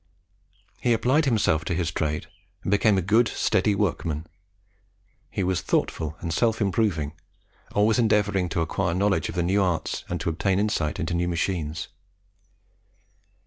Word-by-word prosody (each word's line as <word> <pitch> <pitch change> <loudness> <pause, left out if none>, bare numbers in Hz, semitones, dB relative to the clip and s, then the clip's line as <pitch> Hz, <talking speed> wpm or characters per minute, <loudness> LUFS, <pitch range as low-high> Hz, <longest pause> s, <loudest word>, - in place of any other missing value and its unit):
He 120 +3 +2
applied 130 +7 +2
himself 105 - +2
to 85 - -1
his 85 -1 -1
trade, 75 -1 -2 0.4
and - - -2
became 100 0 +4
a 95 - 0
good, 110 +6 +4
steady 105 -1 +1
workman. 85 -6 -1 1.0
He 100 - -2
was 90 0 0
thoughtful 80 0 -1
and 85 - -3
self 115 +5 +1
improving, 95 -7 0 0.6
always 105 +3 +3
endeavouring 100 -5 +2
to 85 - -1
acquire 85 +1 -1
knowledge 100 -3 +1
of 90 - -6
new 90 +4 +2
arts 85 -5 -1
and 90 - -2
to 85 - 0
obtain 95 +3 0
insight 100 -6 0
into 85 -1 -2
new 85 0 0
machines. 80 -3 -2
95 Hz, 145 wpm, -25 LUFS, 80-105 Hz, 1.0 s, became